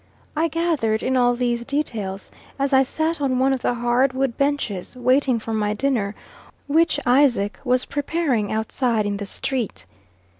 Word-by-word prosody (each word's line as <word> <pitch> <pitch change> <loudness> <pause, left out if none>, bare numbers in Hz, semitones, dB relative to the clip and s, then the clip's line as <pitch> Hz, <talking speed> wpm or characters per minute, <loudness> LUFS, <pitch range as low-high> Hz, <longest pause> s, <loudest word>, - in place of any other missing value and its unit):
I 320 +2 +2
gathered 310 -10 0
in 260 - 0
all 245 -1 +3
these 240 -1 -1
details 225 -9 -3 0.3
as 275 0 0
I 265 - +7
sat 315 +4 -1
on 260 -2 +1
one 265 +1 +3
of 260 - -2
the 245 - 0
hard 240 +2 +2
wood 260 -2 -1
benches, 275 -9 -1
waiting 255 0 +2
for 225 0 -5
my 210 -1 0
dinner, 215 -5 0 0.5
which 320 +1 +2
Isaac 245 -6 +3
was 255 -1 +1
preparing 285 -7 -1
outside 220 0 0
in 205 -1 -1
the 200 0 -5
street. 250 0 -3
255 Hz, 160 wpm, -22 LUFS, 220-280 Hz, 0.5 s, I